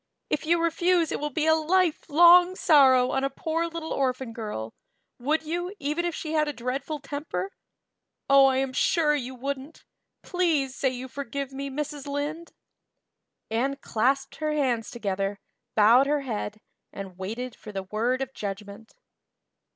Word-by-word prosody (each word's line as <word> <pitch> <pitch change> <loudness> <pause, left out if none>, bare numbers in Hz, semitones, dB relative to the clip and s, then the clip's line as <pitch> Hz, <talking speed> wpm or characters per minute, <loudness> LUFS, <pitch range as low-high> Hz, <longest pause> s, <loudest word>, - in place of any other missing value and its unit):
If 305 - -1
you 340 +1 +3
refuse 335 0 +2
it - - -2
will 295 - -2
be 305 +2 -1
a 320 - +5
lifelong 350 +1 +5
sorrow 265 -7 +5
on 270 - 0
a 275 - +1
poor 325 +4 -2
little 330 -1 -5
orphan 255 -3 -1
girl, 210 - -5 0.5
would 300 +6 0
you, 350 +5 -3
even 300 +3 -2
if 345 -2 -2
she 310 - -5
had 305 -1 +2
a 295 - -2
dreadful 270 +5 -3
temper? 275 - -5 0.8
Oh, 275 -1 +7
I 265 -1 +2
am 265 -1 -1
sure 305 +2 +2
you 260 -3 -3
wouldn't. 275 +4 -6 0.4
Please 325 -8 0
say 265 - 0
you 255 0 -6
forgive 275 0 -5
me, 275 +1 -4
Mrs. 290 0 -5
Lynde." 295 +4 -4 1.0
Anne 260 +5 0
clasped 270 +1 0
her 305 -1 -1
hands 250 -6 0
together, 200 -3 -3 0.4
bowed 230 +6 +6
her 295 0 +1
head, 215 -4 -4 0.3
and 190 -2 -9
waited 230 +6 -5
for 210 - -10
the 195 -1 -4
word 235 +7 -1
of 265 0 -9
judgment. 200 +2 -7
275 Hz, 160 wpm, -26 LUFS, 245-310 Hz, 1.0 s, Oh